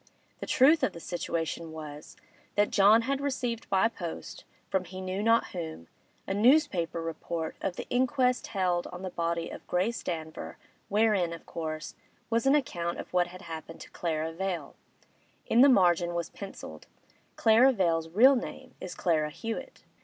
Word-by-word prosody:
The - - -6
truth 295 +5 +5
of 190 - +1
the 170 - -9
situation 165 -1 -3
was, 150 -1 -9 0.4
that 205 0 +2
John 210 +3 +6
had 275 +2 -1
received 250 -5 -2
by 195 +3 +4
post, 175 -7 -7 0.2
from 190 -1 -1
he 185 +1 -8
knew 185 +1 -3
not 230 +2 +3
whom, 160 - -7 0.4
a - - -2
newspaper 205 - +3
report 165 0 -4
of 190 -2 -2
the - - -6
inquest 255 0 +2
held 180 -4 0
on 180 +1 -8
the 185 - -4
body 170 -1 -2
of - - -10
Grace 195 +6 0
Danver, 160 -2 -5 0.3
wherein, 205 -5 +2
of 170 - -10
course, 155 -2 -5 0.4
was 230 +3 +2
an 275 - +6
account 175 -12 -1
of - - -8
what 180 -1 +3
had 185 +1 -11
happened 165 -1 -8
to - - -11
Clara 160 -1 -2
Vale; 175 -4 -4 0.7
in 235 - +4
the 280 - +8
margin 175 -6 +4
was 170 -1 -3
pencilled, 195 -1 -9 0.5
'Clara 230 +4 +6
Vale's 165 -7 +1
real 250 +11 +6
name 255 +1 -6
is 180 -1 -6
Clara 155 -3 +1
Hewett. 230 - -6
185 Hz, 165 wpm, -29 LUFS, 165-230 Hz, 0.7 s, the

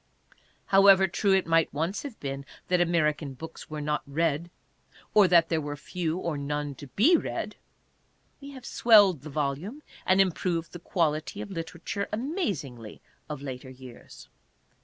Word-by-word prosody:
However 195 -1 +6
true 195 +2 0
it 190 - +1
might 165 0 +2
once 165 +7 -2
have 275 -6 -8
been 135 -1 -4 0.3
that 180 -1 +3
American 150 -5 +1
books 160 +4 -10
were 155 -1 -5
not 150 0 -1
read, 160 +2 0 0.6
or 205 -3 +7
that 170 -2 +5
there 160 -2 +1
were 145 0 -4
few 165 +2 -3
or 170 -5 -3
none 145 0 -3
to 140 +2 -11
be 225 - +4
read, - - -3 0.9
we 280 - -9
have 260 -3 -11
swelled 205 - +5
the 155 - -9
volume 150 - -3 0.2
and 185 +1 +4
improved 175 -3 +1
the 175 - -8
quality 155 -3 -1
of 200 - -6
literature 170 +3 -4
amazingly 200 - -3 0.3
of 150 -2 -6
later 130 -1 -7
years. 130 -2 -13
165 Hz, 155 wpm, -27 LUFS, 145-195 Hz, 0.9 s, or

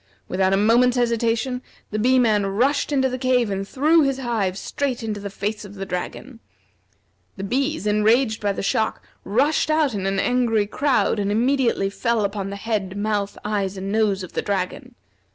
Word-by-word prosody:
Without 190 +1 +1
a 195 - +3
moment's 240 +4 +4
hesitation, 235 +1 0 0.3
the 215 - -2
Bee 255 +4 +3
man 215 -5 +3
rushed 255 +10 +1
into 265 -2 +2
the 255 0 -4
cave 250 -4 +2
and 195 0 -3
threw 310 +7 +3
his 275 -2 +1
hive 220 -8 -1
straight 255 +3 -3
into 215 -2 -3
the 200 0 -5
face 210 +2 -4
of 205 0 -11
the 195 0 -5
dragon. 205 +7 -6 1.0
The 195 - -5
bees, 270 +5 -1
enraged 220 +2 +2
by 205 -1 +1
the - - -4
shock, 220 +2 0 0.2
rushed 275 +11 +1
out 310 -4 +2
in 195 -2 -2
an 195 0 0
angry 235 -3 +2
crowd 260 0 +1
and 200 0 0
immediately 235 -3 +1
fell 230 0 0
upon 200 -1 -3
the 200 - -5
head, 200 -2 -3
mouth, 205 -1 -1
eyes, 200 -2 -1
and 195 +1 -4
nose 210 -3 +1
of 180 - -9
the - - -1
dragon. 190 -3 -3
220 Hz, 185 wpm, -22 LUFS, 200-250 Hz, 1.0 s, moment's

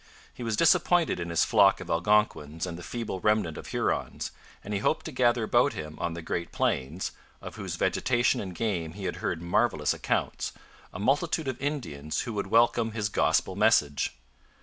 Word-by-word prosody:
He - - -11
was 115 -2 -1
disappointed 175 - +3
in 85 0 -4
his 85 - +2
flock 100 -4 +5
of 90 - -8
Algonquins 85 -4 +1
and 90 -2 -5
the 85 - -8
feeble 115 -1 -4
remnant 105 -5 +1
of - - -8
Hurons, - - -2 0.3
and 105 - -5
he 100 - 0
hoped 155 - 0
to 160 - -5
gather 120 -3 +2
about 110 - +3
him 75 0 -6
on 85 -1 -2
the 85 - -7
Great 85 +1 -3
Plains 70 +8 -1 0.3
of - - -9
whose - - -5
vegetation 120 -1 +1
and 95 -3 -6
game 85 -8 -2
he 100 +1 -8
had - - -3
heard 80 - -3
marvellous 85 -4 +1
accounts - - -2 0.4
a - - -7
multitude 145 - +1
of 130 -1 -4
Indians 80 - -3
who 115 - -5
would 100 -1 -2
welcome 115 -1 +3
his 105 -2 -1
Gospel - - +1
message. 70 -1 +2
105 Hz, 185 wpm, -28 LUFS, 85-120 Hz, 0.4 s, flock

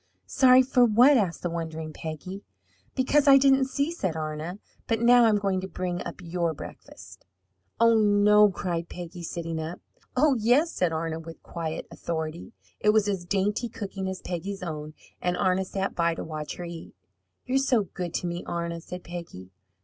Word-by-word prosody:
"Sorry 255 - +6
for 255 -1 +3
what?" 245 +5 +6
asked 195 -8 0
the 175 - 0
wondering 160 -2 -5
Peggy. 165 +6 -7 0.5
"Because 280 +2 +2
I 275 -1 +9
didn't 270 -1 +4
see," 280 +4 -1
said 190 - -2
Arna. 155 +3 -4 0.3
"But 225 -1 +1
now 240 +1 +6
I'm 220 -2 +4
going 195 -2 0
to 190 - -5
bring 180 -1 -3
up - - -8
your 170 -1 -1
breakfast." - - -11 0.6
"Oh, 230 0 +6
no!" 210 0 +5
cried 170 -3 -3
Peggy, 175 0 -8
sitting 165 -1 -4
up. 160 +3 -5 0.4
"Oh, 295 +2 +5
yes!" 255 +10 +3
said 180 -2 0
Arna, 160 0 -2
with 165 0 -11
quiet 160 -2 -5
authority. 160 +4 -5 0.3
It 210 - +2
was 210 -1 +4
as 190 -4 -2
dainty 205 +5 0
cooking 195 -3 -5
as 190 - -6
Peggy's 185 +2 -4
own, 155 -2 -6 0.3
and 180 0 0
Arna 185 +1 +1
sat 195 +1 -3
by 170 -1 +1
to - - -5
watch 155 -1 -5
her 175 - -6
eat. 170 -1 -9 0.5
"You're 260 +1 +2
so 255 -5 +2
good 180 -1 -6
to - - -2
me, 175 0 -3
Arna!" 170 -1 -3
said 180 +1 -8
Peggy. 170 - -8
180 Hz, 180 wpm, -26 LUFS, 165-220 Hz, 0.6 s, I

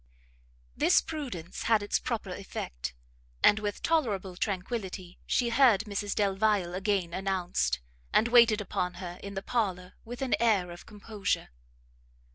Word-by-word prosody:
This - - +5
prudence 255 - -6
had 220 -2 +4
its 205 - 0
proper 215 -5 -3
effect, - - -5 0.5
and 210 - +6
with 205 -1 -4
tolerable 210 - 0
tranquility 190 -2 -4
she 240 -2 +2
heard 235 -4 +5
Mrs 205 -2 -3
Delvile 200 -2 +1
again 190 -2 0
announced, 175 - 0 0.3
and 225 - +4
waited 235 -3 +6
upon 180 -3 -2
her 180 -1 -7
in 200 0 -7
the 195 - -4
parlour 185 -6 -1
with 245 +3 -6
an 260 - 0
air 205 -7 +2
of 175 - -11
composure. 210 -1 -3
200 Hz, 135 wpm, -29 LUFS, 180-225 Hz, 0.5 s, and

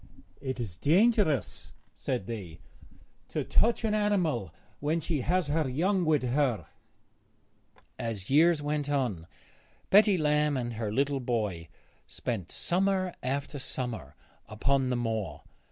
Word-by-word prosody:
'It 130 -2 -4
is 100 -8 -4
dangerous,' 170 - +2 0.2
said 125 -7 -3
they, 95 -8 -6 0.7
'to - - -2
touch 235 +1 +2
an 220 -1 +1
animal 180 - +1 0.3
when 155 +3 0
she 160 -3 -1
has 180 +6 +1
her 150 -1 0
young 180 +8 +1
with 155 -4 +3
her.' 125 -5 +1 1.3
As 110 -4 -4
years 155 +2 +4
went 145 -1 -1
on 120 - -1 0.6
Betty 205 -1 +6
Lamb 150 -2 +2
and 120 -2 -3
her 110 -2 -3
little 140 +4 +1
boy 105 -9 -2 0.4
spent 110 -10 -4
summer 185 0 +1
after 140 +2 -3
summer 115 - -3 0.3
upon 130 +5 +1
the 125 - +1
moor. 110 -10 -3
135 Hz, 125 wpm, -29 LUFS, 115-160 Hz, 1.3 s, Betty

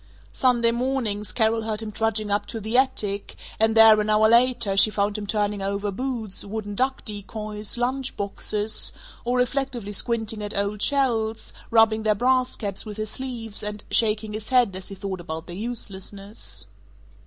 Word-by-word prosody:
Sunday 240 -3 +3
mornings 235 -4 -1
Carol 225 -1 +2
heard 220 -1 -3
him 215 - -5
trudging 215 -1 -1
up 205 0 0
to 225 - -5
the 220 +3 -4
attic 235 -7 0 0.2
and 220 0 +3
there, 220 -1 +8
an 210 - -2
hour 215 0 +5
later, 235 -3 +3
she 200 - +7
found 205 -1 0
him 210 -1 -4
turning 205 -1 0
over 200 +1 -2
boots, 230 -2 -4
wooden 205 0 -5
duck 260 +5 -1
decoys, 210 0 -4
lunch 255 +2 -1
boxes, 210 +1 0 0.3
or 245 +1 0
reflectively 250 -4 -1
squinting 220 0 -1
at 205 -1 -4
old 200 +1 -1
shells, 230 -6 0 0.2
rubbing 225 -1 +4
their 215 -1 +2
brass 255 +3 +2
caps 200 -4 -2
with 215 -1 -8
his 215 0 -3
sleeve 235 -5 -5
and 210 0 -4
shaking 215 -1 +2
his 215 0 -5
head 245 -7 +3
as 185 - -3
he 195 - -5
thought 190 -1 -5
about 160 -1 -6
their 175 - -8
uselessness. 200 - -4
215 Hz, 170 wpm, -24 LUFS, 205-235 Hz, 0.3 s, there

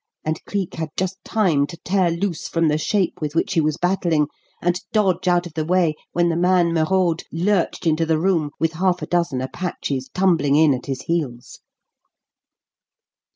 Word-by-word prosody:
and 155 +1 -2
Cleek 195 -3 -3
had 160 -1 -4
just 190 +1 -2
time 170 -10 +1
to 170 - -9
tear 185 -1 +2
loose 170 -1 -2
from 165 -1 +1
the 150 +1 +1
shape 185 0 0
with 150 0 -3
which 195 +4 +1
he 165 - +3
was 155 0 0
battling, 175 -4 +1 0.3
and 175 +1 0
dodge 195 -5 +1
out 175 0 +3
of 170 - -9
the 155 0 -1
way 170 -1 +2 0.2
when 175 0 +2
the 165 - 0
man 175 -1 +3
Merode 170 +1 +1
lurched 185 +1 0
into 160 0 +2
the 160 -1 +2
room, 165 -3 +1
with 165 0 +1
half 180 +2 0
a - - -1
dozen 170 -7 0
Apaches 135 -2 -4
tumbling 165 -7 +2
in 155 -1 +5
at 125 - -5
his 135 -2 -4
heels. 140 -8 -3
170 Hz, 180 wpm, -21 LUFS, 155-185 Hz, 0.3 s, in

